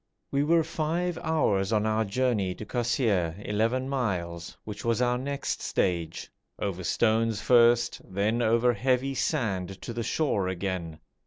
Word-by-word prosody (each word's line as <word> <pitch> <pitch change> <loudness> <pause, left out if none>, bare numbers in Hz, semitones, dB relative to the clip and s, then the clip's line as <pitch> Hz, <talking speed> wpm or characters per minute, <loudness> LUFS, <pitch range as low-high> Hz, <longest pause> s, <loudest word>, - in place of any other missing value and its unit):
We 140 - +2
were 165 +2 +4
five 165 +2 -2
hours 105 -11 +1
on 105 -1 +2
our 110 0 +1
journey 105 -4 0
to 110 - -8
Kosseir 115 - 0
(11 115 +5 0
miles), 90 -11 -3
which 105 -1 -7
was 115 -1 +1
our 125 0 +2
next 140 +1 -3
stage, 85 -3 -1 0.3
over 95 -2 -3
stones 110 +3 +1
first, 120 -1 +4
then 105 +5 0
over 115 +2 +3
heavy 130 +4 +1
sand 100 - -1
to 115 - -5
the 120 - -3
shore 115 -7 0
again. 90 -3 -3
115 Hz, 145 wpm, -27 LUFS, 95-130 Hz, 0.3 s, were